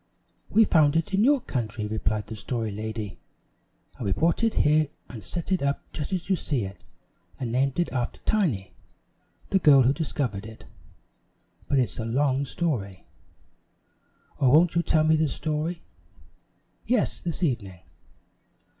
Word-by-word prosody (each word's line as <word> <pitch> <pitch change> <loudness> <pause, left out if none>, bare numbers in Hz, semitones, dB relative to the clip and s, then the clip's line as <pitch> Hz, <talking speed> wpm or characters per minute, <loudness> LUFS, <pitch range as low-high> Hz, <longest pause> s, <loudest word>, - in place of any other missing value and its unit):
"We 225 - +5
found 155 -7 +4
it 165 +4 0
in 200 +2 +3
your 285 +3 +5
country," 110 - -3
replied 110 0 -1
the 110 - -7
Story 110 +1 -3
Lady; 110 -1 -5 0.8
"and - - -5
we - - +1
brought 165 - +1
it 225 - +2
here 155 +1 +3 0.2
and 110 -5 -9
set 175 - -4
it 185 - +2
up 140 0 -1
just 150 +2 -4
as 185 -2 -2
you 190 - +3
see 135 - -1
it 95 +1 -10 0.6
and 125 -4 -3
named 135 +4 +1
it 175 - 0
after 125 -2 -2
Tiny, 150 - 0 0.8
the 195 - +4
girl 140 -6 +7
who 130 +3 +3
discovered 125 -10 -3
it 110 0 -12 1.0
but 140 - +1
it's 115 -10 0
a 110 - -2
long 135 +3 +1
story." 125 - -3 1.3
"Oh, 130 - +4
won't 160 +5 +5
you 170 - +2
tell 155 -2 +2
me 160 0 +4
the 155 0 +2
story?" 155 +4 -3 1.0
"Yes; 245 -3 0
this 175 +1 -4
evening." 100 - -2
140 Hz, 155 wpm, -26 LUFS, 110-165 Hz, 1.3 s, girl